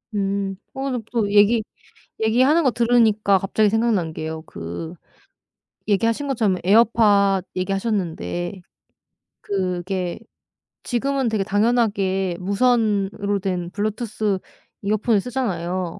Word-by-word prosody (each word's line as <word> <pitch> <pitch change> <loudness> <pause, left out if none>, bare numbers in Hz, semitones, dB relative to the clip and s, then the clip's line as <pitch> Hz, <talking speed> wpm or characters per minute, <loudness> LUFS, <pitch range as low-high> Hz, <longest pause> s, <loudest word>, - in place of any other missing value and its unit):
음. 195 -1 -1 0.2
오늘 265 -3 -3
또 215 -4 0
얘기 210 +2 +4 0.6
얘기하는 260 +9 +3
거 260 - +3
들으니까 225 -4 +3
갑자기 205 +3 +1
생각난 210 -7 +1
게요. 160 0 -5
그 85 - -7 1.0
얘기하신 230 +7 +1
것처럼 215 -8 +1
에어팟 205 -2 +4
얘기하셨는데 190 -2 -2 0.8
그게 185 -2 -2 0.6
지금은 265 0 0
되게 215 -3 0
당연하게 200 -4 +1
무선으로 205 -1 +1
된 180 -3 -3
블루투스 210 -1 -2 0.4
이어폰을 215 +2 +2
쓰잖아요. 185 -8 -3
205 Hz, 255 characters per minute, -22 LUFS, 190-230 Hz, 1.0 s, 얘기